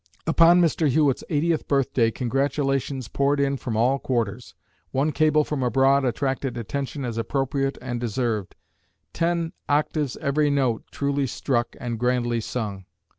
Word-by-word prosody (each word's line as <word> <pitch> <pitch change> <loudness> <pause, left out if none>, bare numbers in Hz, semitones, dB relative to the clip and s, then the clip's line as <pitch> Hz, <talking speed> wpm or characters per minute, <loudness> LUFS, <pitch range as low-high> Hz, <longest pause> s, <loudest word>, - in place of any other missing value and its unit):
Upon 165 +2 +6
Mr. 165 -3 +2
Hewitt's 145 -1 +2
eightieth 160 +1 0
birthday 130 -4 +2
congratulations 135 +1 -1
poured 140 +1 +1
in 140 0 +1
from 120 -4 -4
all 130 +4 +2
quarters. 120 -3 -2 0.3
One 140 +4 0
cable 155 0 +3
from 150 -2 -3
abroad 135 +3 +3
attracted 130 0 -1
attention 135 +4 -4
as 115 -2 -3
appropriate 135 +2 -1
and 120 -2 -3
deserved: 115 -4 -2 0.6
"Ten 170 0 0 0.2
octaves 145 -1 0
every 150 0 +1
note 130 -5 0
truly 140 -1 -1
struck 120 -1 -1
and 120 -2 -4
grandly 120 -1 +1
sung." 105 -5 -4
135 Hz, 135 wpm, -24 LUFS, 120-145 Hz, 0.6 s, Upon